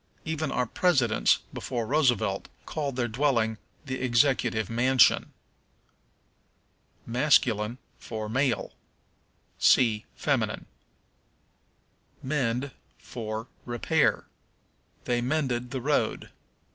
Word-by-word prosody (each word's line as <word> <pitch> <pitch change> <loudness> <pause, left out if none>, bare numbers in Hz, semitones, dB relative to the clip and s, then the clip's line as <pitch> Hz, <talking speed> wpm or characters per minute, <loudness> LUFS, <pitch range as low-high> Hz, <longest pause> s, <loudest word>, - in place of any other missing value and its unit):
Even 160 -2 -2
our 125 - 0
presidents, 130 -5 +2
before 120 -3 -3
Roosevelt, 120 -7 +1 0.2
called 145 -4 -3
their 125 -2 0
dwelling 115 -3 0 0.3
the 130 -2 -4
Executive 120 -3 +2
Mansion. 125 +3 +3 1.7
Masculine 120 -3 +2 0.2
for 110 -2 -5
Male. 130 +3 0 0.9
See 110 -4 +4
Feminine. - - -1 1.6
Mend 130 -1 -1 0.3
for 110 -1 -6 0.2
Repair. 140 +6 +1 0.8
"They 120 -1 0
mended 125 -2 -1
the 130 0 -4
road." 145 +3 -1
125 Hz, 80 wpm, -27 LUFS, 115-140 Hz, 1.7 s, See